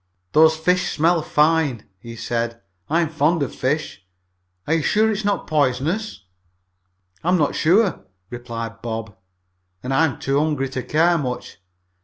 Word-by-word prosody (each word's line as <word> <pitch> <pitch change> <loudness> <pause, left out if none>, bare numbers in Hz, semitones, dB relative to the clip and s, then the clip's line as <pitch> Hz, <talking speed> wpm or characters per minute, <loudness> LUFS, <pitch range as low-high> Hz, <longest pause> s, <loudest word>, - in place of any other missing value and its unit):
"Those 160 +1 +5
fish 180 +3 +1
smell 165 +2 +3
fine," 150 -6 +1
he 115 +3 -10
said. 115 0 -3 0.3
"I'm 165 +2 +2
very 160 - -18
fond 155 +1 +3
of 140 - -4
fish. 140 - -2 0.6
Are 155 - 0
you 165 - +2
sure 215 +8 +2
those 215 -1 -1
are - - -1
not 205 - 0
poisonous?" 150 - -1 1.0
"I'm 180 +3 +3
not 150 -4 +1
sure," 185 +3 +2 0.2
replied 115 -2 -6
Bob, 110 -3 -5 0.7
"and 130 +1 -2
I'm 150 0 +2
too 135 +1 0
hungry 145 -3 0
to 130 0 -4
care 165 +7 +2
much. 125 - -5
150 Hz, 150 wpm, -21 LUFS, 125-165 Hz, 1.0 s, Those